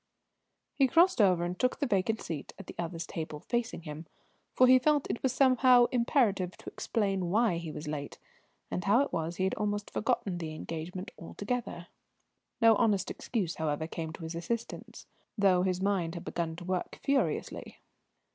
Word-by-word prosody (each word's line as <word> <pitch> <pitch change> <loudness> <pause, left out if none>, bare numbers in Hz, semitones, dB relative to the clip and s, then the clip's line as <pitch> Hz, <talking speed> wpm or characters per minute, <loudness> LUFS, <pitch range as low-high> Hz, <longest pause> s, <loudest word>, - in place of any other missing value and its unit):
He 270 - +3
crossed 340 0 +4
over 180 -4 +4
and 175 +1 -3
took 255 - +1
the 290 - 0
vacant 220 -1 0
seat 155 -4 -6
at 195 - -10
the - - -9
other's 170 -1 -3
table, 155 -2 -6
facing 240 -7 -2
him; 155 +1 -8 0.5
for 255 - +6
he 255 0 +7
felt 295 +2 +2
it - - -4
was 265 - +1
somehow 255 -1 +5
imperative 235 - +1
to - - -9
explain 195 -5 -1
why 215 -2 +2
he 165 -2 -6
was 150 0 -7
late, 145 -1 -5 0.5
and 180 - -2
how 210 +7 +4
it 285 - -2
was 165 +1 -2
he 185 - -1
had 190 - +1
almost 205 -1 -2
forgotten 220 -6 -1
the 155 -2 -5
engagement 170 +4 -6
altogether. 205 0 -4 0.7
No 230 -2 +6
honest 210 -5 +2
excuse, 195 -9 -3
however, 155 -1 -1
came 160 0 -5
to 165 - -9
his 160 +1 -5
assistance, 225 +8 -5 0.3
though 190 -3 +4
his 185 0 0
mind 185 -4 0
had 170 - -7
begun 165 -2 -3
to 175 +1 -9
work 185 -1 -3
furiously. 275 -1 -1
190 Hz, 175 wpm, -30 LUFS, 170-235 Hz, 0.7 s, he